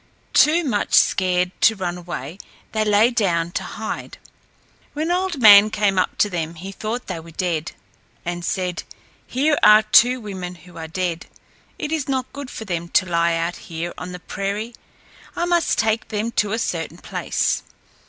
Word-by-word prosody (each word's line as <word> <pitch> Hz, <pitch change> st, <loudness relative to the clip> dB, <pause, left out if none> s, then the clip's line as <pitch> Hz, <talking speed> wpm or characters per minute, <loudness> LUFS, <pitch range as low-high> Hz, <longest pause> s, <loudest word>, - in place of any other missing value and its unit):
Too 325 Hz, +4 st, +5 dB
much 215 Hz, -9 st, 0 dB
scared 180 Hz, -1 st, +3 dB
to 225 Hz, -, +5 dB
run 180 Hz, -3 st, -3 dB
away, 175 Hz, -1 st, -7 dB, 0.3 s
they 215 Hz, -1 st, 0 dB
lay 210 Hz, +3 st, +4 dB
down 175 Hz, -7 st, 0 dB
to -, -, -2 dB
hide. -, -, -6 dB, 0.8 s
When 315 Hz, +3 st, -2 dB
Old 360 Hz, -4 st, -1 dB
Man 210 Hz, -2 st, +9 dB
came 205 Hz, -3 st, +1 dB
up 185 Hz, -, -1 dB
to -, -, +3 dB
them 170 Hz, -3 st, -4 dB
he 185 Hz, +4 st, -8 dB
thought 220 Hz, +5 st, -4 dB
they 185 Hz, -4 st, -5 dB
were 165 Hz, +1 st, -12 dB
dead, 165 Hz, -1 st, -2 dB, 0.5 s
and 175 Hz, 0 st, -4 dB
said, 180 Hz, 0 st, -2 dB, 0.5 s
"Here 290 Hz, +4 st, +1 dB
are 210 Hz, +1 st, +7 dB
two 245 Hz, +4 st, +5 dB
women 190 Hz, -5 st, -6 dB
who 175 Hz, +1 st, -17 dB
are 160 Hz, -1 st, -6 dB
dead. 170 Hz, 0 st, -3 dB, 0.5 s
It 300 Hz, -, -4 dB
is 310 Hz, -4 st, -2 dB
not 260 Hz, -1 st, -2 dB
good 280 Hz, -2 st, -7 dB
for 220 Hz, -, -7 dB
them 170 Hz, -3 st, -3 dB
to 185 Hz, -, +3 dB
lie 170 Hz, -1 st, +1 dB
out 165 Hz, +1 st, -2 dB
here 170 Hz, +1 st, -6 dB
on 180 Hz, -, -7 dB
the 180 Hz, -, -7 dB
prairie. 200 Hz, +6 st, -4 dB, 0.6 s
I 345 Hz, -, 0 dB
must 345 Hz, -2 st, +1 dB
take 220 Hz, 0 st, +1 dB
them 215 Hz, +2 st, -2 dB
to 210 Hz, -3 st, 0 dB
a 225 Hz, -, 0 dB
certain 165 Hz, -8 st, -3 dB
place." -, -, -1 dB
195 Hz, 175 wpm, -21 LUFS, 175-230 Hz, 0.8 s, Man